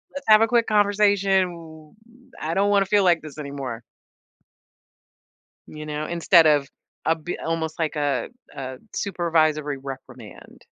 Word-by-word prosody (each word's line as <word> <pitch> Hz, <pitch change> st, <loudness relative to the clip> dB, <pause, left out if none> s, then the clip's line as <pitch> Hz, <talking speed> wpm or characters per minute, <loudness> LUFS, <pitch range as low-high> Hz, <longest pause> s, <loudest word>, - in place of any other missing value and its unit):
let's 280 Hz, 0 st, -7 dB
have 215 Hz, 0 st, +8 dB
a 225 Hz, -, +4 dB
quick 235 Hz, -1 st, +2 dB
conversation. 200 Hz, -2 st, +3 dB
W 160 Hz, -2 st, -13 dB, 0.5 s
I 160 Hz, +2 st, -2 dB
don't 200 Hz, +1 st, +2 dB
wanna 200 Hz, -1 st, +3 dB
feel 205 Hz, 0 st, +3 dB
like 175 Hz, -3 st, +3 dB
this 155 Hz, -1 st, -11 dB
anymore." 140 Hz, -5 st, -6 dB, 1.9 s
You 150 Hz, 0 st, -9 dB
know? 150 Hz, 0 st, -4 dB
Instead 170 Hz, 0 st, +4 dB
of 145 Hz, -2 st, +3 dB, 0.4 s
a 160 Hz, -, +4 dB
b 165 Hz, +2 st, -6 dB
almost 160 Hz, -1 st, -3 dB
like 160 Hz, -2 st, -2 dB
a 140 Hz, -5 st, -1 dB, 0.3 s
a 130 Hz, -2 st, -7 dB, 0.2 s
supervisory 155 Hz, -6 st, 0 dB
reprimand. 135 Hz, -1 st, -11 dB
160 Hz, 140 wpm, -23 LUFS, 150-195 Hz, 1.9 s, have